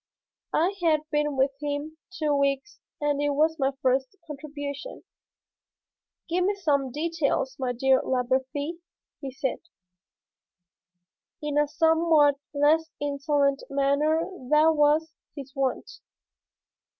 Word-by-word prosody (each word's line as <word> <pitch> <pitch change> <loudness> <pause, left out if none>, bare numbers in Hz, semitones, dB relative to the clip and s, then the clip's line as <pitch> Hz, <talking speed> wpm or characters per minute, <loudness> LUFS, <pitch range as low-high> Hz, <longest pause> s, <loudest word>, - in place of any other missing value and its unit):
I 350 +5 +2
had 315 -3 +3
been 295 -1 0
with 265 +1 +3
him 295 +2 -4
two 310 -5 -1
weeks 280 +5 -1 0.2
and 290 -1 0
it 290 - +1
was 315 +2 +2
my 270 -1 +2
first 265 +4 +1
contribution. 290 - -7 1.2
"Give 355 +2 0
me 400 +2 +1
some 285 -8 0
details, 300 -3 -1
my 255 -2 -1
dear 260 +2 +3
Labarthe," 265 +5 -1 0.4
he 275 - -4
said, 265 0 -3 1.8
in 295 -1 -3
a 295 0 +3
somewhat 320 -2 +3
less 305 +3 +2
insolent 280 -1 0
manner 280 +3 +2
than 310 -2 +2
was 300 +2 +3 0.2
his 275 -3 -9
wont. 270 -2 -1
290 Hz, 115 wpm, -26 LUFS, 275-315 Hz, 1.8 s, had